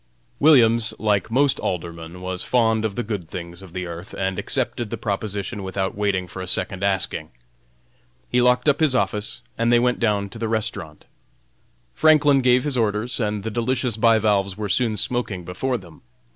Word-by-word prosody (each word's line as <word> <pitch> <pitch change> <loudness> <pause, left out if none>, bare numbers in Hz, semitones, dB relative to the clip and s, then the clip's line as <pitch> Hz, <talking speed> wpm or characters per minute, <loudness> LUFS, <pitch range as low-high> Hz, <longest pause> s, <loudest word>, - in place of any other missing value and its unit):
Williams, 115 -7 +5
like 105 -1 0
most 135 +4 +2
Aldermen, 85 -1 -5
was 90 0 -4
fond 115 -3 +2
of 105 -3 -2
the 120 - -2
good 100 -7 -5
things 85 0 -7
of 95 -3 -12
this 90 0 -4
earth, 85 +1 -8
and 95 -1 -1
accepted 120 -3 -2
the - - -4
proposition 105 0 -3
without 95 0 -3
waiting 100 -3 0
for 95 - -8
a 95 - -6
second 95 +1 -1
asking. 95 -5 -1 1.0
He 125 - +2
locked 125 +3 +3
up 145 -1 +4
his 155 -5 +3
office, 105 -4 -1 0.2
and 115 +1 +2
they 120 - +6
went 125 +1 +1
down 105 -3 +1
to 115 - -10
the 115 - -1
restaurant. 105 -8 -4 0.9
Franklin 145 -3 +4
gave 125 0 +4
his 145 -4 0
orders, 110 +1 0
and 105 -3 -1
the 110 - -3
delicious 120 +1 0
bivalves 105 -4 +2
were 105 -1 -3
soon 110 +1 +1
smoking 110 -6 -2
before 125 +9 -2
them. 85 -6 -15
105 Hz, 175 wpm, -22 LUFS, 95-120 Hz, 1.0 s, they